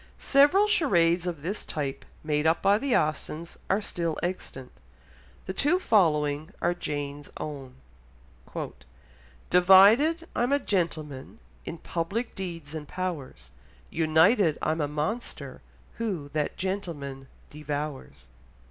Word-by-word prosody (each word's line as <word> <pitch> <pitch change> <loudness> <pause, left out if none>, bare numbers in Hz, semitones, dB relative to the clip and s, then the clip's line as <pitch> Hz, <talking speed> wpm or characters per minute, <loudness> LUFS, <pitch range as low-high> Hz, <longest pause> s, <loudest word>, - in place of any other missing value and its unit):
Several 290 +9 +5
charades 180 - +3
of 165 -5 -4
this 195 +5 -3
type 140 -3 -4 0.2
made 150 0 +1
up 160 - +2
by 200 +2 +4
the 275 -2 +1
Austens 155 +2 -3
are 200 +2 +1
still 170 -4 -2
extant; 175 -7 -5 0.7
the 190 - -4
two 295 - +2
following 155 - +2
are 175 - +1
Jane's 145 -3 -5
own. 135 -4 -7 1.8
"Divided 210 - +6
I'm 245 +2 +1
a 285 - +5
gentleman 160 - -3 0.3
In - - -5
public 175 +9 -3
deeds 170 -6 -6
and 155 -2 -6
powers; 175 - -5 0.4
United, 160 +3 +4
I'm 155 +1 0
a 145 - 0
monster, 150 - -4 0.4
who 185 -11 -3
That 150 0 -2
gentleman 155 -9 -4 0.2
devours." 145 - -5
165 Hz, 115 wpm, -27 LUFS, 150-195 Hz, 1.8 s, Divided